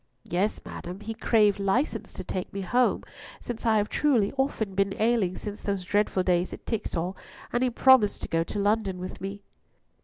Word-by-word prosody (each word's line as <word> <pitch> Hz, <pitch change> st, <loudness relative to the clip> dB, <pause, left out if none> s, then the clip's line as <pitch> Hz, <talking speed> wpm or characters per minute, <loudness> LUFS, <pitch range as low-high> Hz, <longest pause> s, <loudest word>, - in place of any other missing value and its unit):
"Yea, 185 Hz, +5 st, +1 dB, 0.2 s
madam; 180 Hz, +2 st, -7 dB
he 225 Hz, +1 st, -4 dB
craved 215 Hz, -3 st, +3 dB
license 215 Hz, +2 st, 0 dB
to 185 Hz, -, -7 dB
take 185 Hz, 0 st, -4 dB
me 200 Hz, -, -4 dB
home, 245 Hz, +7 st, +2 dB, 0.4 s
since 235 Hz, -1 st, -5 dB
I 220 Hz, -1 st, +4 dB
have 210 Hz, 0 st, +1 dB
truly 240 Hz, -9 st, +2 dB
often 265 Hz, -7 st, -1 dB
been 195 Hz, 0 st, 0 dB
ailing 215 Hz, -5 st, +2 dB
since 210 Hz, 0 st, -6 dB
those 200 Hz, -3 st, -2 dB
dreadful 205 Hz, -1 st, +1 dB
days 180 Hz, 0 st, +1 dB
at -, -, -10 dB
Tixall, 185 Hz, -5 st, -2 dB, 0.4 s
and 240 Hz, -, +1 dB
he 255 Hz, -, +3 dB
hath 240 Hz, -, -4 dB
promised 260 Hz, -6 st, +5 dB
to -, -, -3 dB
go 165 Hz, 0 st, +1 dB
to 170 Hz, -, -6 dB
London 205 Hz, -2 st, +1 dB
with 185 Hz, +1 st, -7 dB
me." 195 Hz, +1 st, -6 dB
205 Hz, 190 wpm, -27 LUFS, 190-225 Hz, 0.4 s, promised